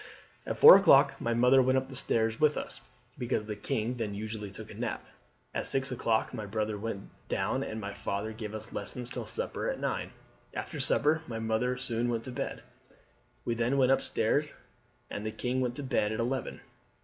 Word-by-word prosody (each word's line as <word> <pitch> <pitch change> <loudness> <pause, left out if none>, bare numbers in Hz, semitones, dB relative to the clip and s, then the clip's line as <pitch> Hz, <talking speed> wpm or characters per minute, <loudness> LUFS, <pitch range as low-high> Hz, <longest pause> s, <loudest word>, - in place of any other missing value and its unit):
"At - - -2
four - - +12
o'clock - - +6
my 115 0 0
mother 125 +3 +6
went 130 +1 +3
up 130 +1 -2
stairs 115 -3 0
with 150 -1 +4
us, - - -5 0.4
because 120 -3 -1
the 105 0 -4
king 115 +4 -2
then 105 -3 -3
usually 105 0 -5
took 95 - -10
a - - -8
nap. - - -4 0.5
At - - -1
six 135 0 +1
o'clock 115 -3 0
my 105 - -5
brother 105 +1 -1
went 105 -1 -5 0.2
down, - - 0
and 110 - -4
my 100 -1 -5
father 100 +3 -3
gave 110 -1 -6
us 110 - -8
lessons 120 +4 -5
till 120 -4 -5
supper - - -3
at - - -3
nine. - - -2 0.5
After - - -5
supper 155 +2 +2
my 115 - -4
mother 115 +3 0
soon 120 0 -1
went 115 -1 -1
to 130 - -7
bed. 125 - -4 0.8
We 120 - +1
then 120 +4 +1
went 130 -1 +4
up 135 - +4
stairs, - - 0 0.6
and 100 - -4
the 110 - -2
king 125 +3 -1
went 125 -1 -1
to 145 - -5
bed 120 -5 +1
at 110 - -3
eleven. 125 +2 -2
115 Hz, 195 wpm, -30 LUFS, 110-125 Hz, 0.8 s, four